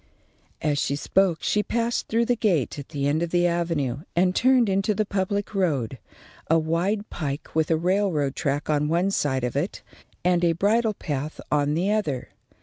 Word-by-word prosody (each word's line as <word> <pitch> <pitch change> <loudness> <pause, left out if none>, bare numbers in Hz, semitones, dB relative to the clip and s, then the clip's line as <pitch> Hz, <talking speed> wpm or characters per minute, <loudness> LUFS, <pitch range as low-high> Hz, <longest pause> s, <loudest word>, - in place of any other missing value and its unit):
As 150 -2 +1
she 140 - 0
spoke, 180 +3 +1
she 210 - +2
passed 235 +2 -1
through 230 +1 +1
the 245 - +2
gate 175 - 0
at 140 - -9
the 140 -3 -2
end 150 +3 +1
of 170 - -1
the 175 +1 +2
avenue 165 -7 0 0.2
and 180 +1 +2
turned 255 -2 +4
into 195 +2 +1
the 215 - +1
public 200 +1 -2
road, 140 - 0 0.5
a 165 - +5
wide 175 +7 0
pike 145 -3 -4
with 160 -1 +1
a 165 - +3
railroad 175 -5 +1
track 145 -2 -1
on 150 -1 +1
one 175 +5 +1
side 130 -8 0
of 125 - -2
it - - -2 0.4
and 180 -1 +3
a 170 -1 +4
bridle 215 +5 +1
path 150 -2 -4
on 145 0 +2
the 185 +5 +1
other. 175 -13 -1
170 Hz, 185 wpm, -25 LUFS, 145-200 Hz, 0.5 s, a